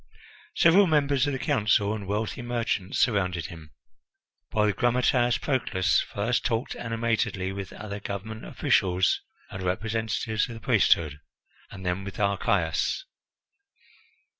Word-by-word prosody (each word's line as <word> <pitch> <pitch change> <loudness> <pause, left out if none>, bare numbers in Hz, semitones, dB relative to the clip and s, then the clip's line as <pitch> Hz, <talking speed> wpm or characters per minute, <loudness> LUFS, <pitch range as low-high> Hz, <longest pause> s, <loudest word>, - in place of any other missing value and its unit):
Several 185 +4 +6
members 145 -3 +2
of 145 - -1
the - - -1
Council 105 -4 +2
and 105 -3 -6
wealthy 105 +5 -2
merchants 115 -6 -2
surrounded 90 -7 +1
him, 80 -4 -10 0.8
while 105 -1 +2
the 105 - +2
grammateus 120 +1 +2
Proclus 95 - +1
first 110 +5 -1
talked 115 +2 -1
animatedly 115 -4 -1
with 95 -1 -6
other 105 -1 -6
government 105 +3 -6
officials 90 -1 +1 0.3
and 95 - -6
representatives 110 +3 -1
of 115 - -7
the - - -8
priesthood, 80 -7 +2 0.5
and 95 -1 -10
then 90 +2 -1
with 100 -1 -8
Archias. 100 - 0
105 Hz, 125 wpm, -26 LUFS, 95-120 Hz, 0.8 s, Several